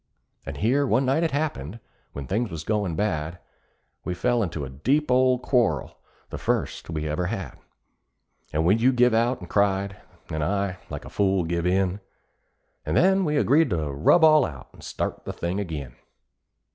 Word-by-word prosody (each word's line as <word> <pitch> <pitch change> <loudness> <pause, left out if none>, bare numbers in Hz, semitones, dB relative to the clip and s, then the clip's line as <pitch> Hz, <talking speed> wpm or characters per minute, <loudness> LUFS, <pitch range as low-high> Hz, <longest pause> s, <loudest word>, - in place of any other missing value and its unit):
And 70 +1 -5
here 135 - +2
one 130 +1 +2
night 135 +5 +2
it 165 - +1
happened, 125 - -3 0.3
when 70 - -6
things 110 - -1
was 80 -3 -6
goin' 100 -3 -1
bad, 85 -4 -2 0.7
We 90 - -3
fell 120 +6 +1
in 95 -7 -1
a 75 -5 -4
deep 130 - 0
old 130 0 +3
quarrel 125 -3 0 0.3
the - - -5
first - - -2
we 80 -2 -3
ever 80 +4 -1
had; 90 -8 -5 0.9
And 80 +2 0
when 100 +6 +4
you 125 +3 +4
give 125 -1 +4
out 115 0 +1
and 90 - -8
cried, 100 0 +1 0.3
then 80 - -3
I, 95 +3 -1
like - - -6
a - - -8
fool, 95 -2 +1
give 85 +1 -1
in, 95 +1 +1 0.8
And 75 +2 -1
then 190 +2 +4
we 150 -1 0
agreed 145 +1 +3
to 80 -6 -1
rub 75 - +4
all 155 -2 +7
out, 70 - -6
and - - -16
start - - -4
the - - -5
thing 85 +3 -3
ag'in. 75 -10 -5
95 Hz, 180 wpm, -25 LUFS, 80-125 Hz, 0.9 s, all